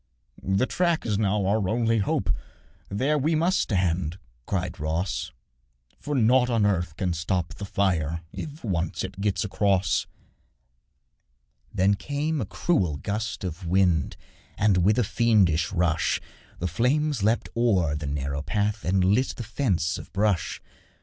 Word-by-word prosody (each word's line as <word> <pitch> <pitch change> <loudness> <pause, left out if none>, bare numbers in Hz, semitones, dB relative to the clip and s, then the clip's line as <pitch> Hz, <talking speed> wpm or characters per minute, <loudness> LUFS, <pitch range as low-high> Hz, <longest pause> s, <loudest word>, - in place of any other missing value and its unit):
'The 95 +6 +1
track 170 +2 0
is 105 -3 0
now 105 -1 +1
our 100 -1 +1
only 115 0 +2
hope, 100 - 0 0.6
There 140 +9 +1
we 155 +4 +1
must 175 +4 +2
stand,' 90 -4 0 0.3
cried 90 -2 -2
Ross, 80 +5 -2 0.7
'For 145 0 -3
nought 125 +1 +4
on 115 -3 +2
earth 90 -5 0
can 90 0 -1
stop 85 +1 -2
the 100 - -7
fire 85 -5 0
If 150 0 -7
once 85 -6 -1
it 95 +1 -6
gets 105 -1 0
across.' 100 -2 +1 1.6
Then 95 +2 +3
came 145 +7 -2
a - - -3
cruel 90 - 0
gust 105 +4 -3
of 90 0 -5
wind, 85 -6 +2 0.4
And, 105 -3 +3
with 100 +5 +3
a 125 - +3
fiendish 95 -8 +2
rush, 85 -4 +1 0.4
The 90 - -2
flames 130 - +1
leapt 110 +4 +1
o'er 95 -10 +2
the 75 -1 -4
narrow 70 0 -2
path 100 +7 -1
And 95 +1 +2
lit 105 +8 +2
the 120 - -5
fence 95 - 0
of - - -11
brush. 100 -5 0
100 Hz, 145 wpm, -26 LUFS, 85-115 Hz, 1.6 s, nought